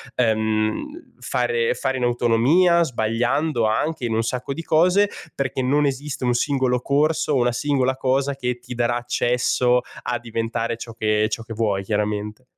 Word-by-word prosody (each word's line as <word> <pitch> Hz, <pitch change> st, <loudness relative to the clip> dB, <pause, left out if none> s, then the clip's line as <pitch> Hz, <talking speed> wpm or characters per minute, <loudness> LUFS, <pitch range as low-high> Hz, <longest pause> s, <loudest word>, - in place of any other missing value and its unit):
ehm, 110 Hz, -, -1 dB
fare 470 Hz, +1 st, 0 dB
fare 135 Hz, -, -2 dB
in 125 Hz, -, -2 dB
autonomia, 125 Hz, +9 st, +3 dB
sbagliando 120 Hz, +2 st, 0 dB
anche 130 Hz, +7 st, -1 dB
in 115 Hz, -, -1 dB
un 115 Hz, -, +2 dB
sacco 125 Hz, +3 st, -3 dB
di 165 Hz, -, -6 dB
cose, 180 Hz, +6 st, +3 dB, 0.2 s
perché 135 Hz, -1 st, -2 dB
non 145 Hz, +3 st, +2 dB
esiste 140 Hz, -1 st, -3 dB
un 125 Hz, -, +2 dB
singolo 130 Hz, -1 st, +1 dB
corso 150 Hz, +2 st, +1 dB
o 135 Hz, -, +3 dB
una 120 Hz, 0 st, +2 dB
singola 130 Hz, 0 st, 0 dB
cosa 135 Hz, +1 st, 0 dB
che 125 Hz, -2 st, -3 dB
ti 125 Hz, 0 st, -8 dB
darà 120 Hz, 0 st, +1 dB
accesso 125 Hz, 0 st, +1 dB, 0.2 s
a 120 Hz, -1 st, -2 dB
diventare 115 Hz, 0 st, -3 dB
ciò 115 Hz, 0 st, -8 dB
che 110 Hz, -1 st, +1 dB
ciò 115 Hz, +1 st, -4 dB
che 115 Hz, -, -8 dB
vuoi, 105 Hz, -3 st, 0 dB
chiaramente. 105 Hz, +2 st, -2 dB
125 Hz, 160 wpm, -22 LUFS, 115-140 Hz, 0.2 s, autonomia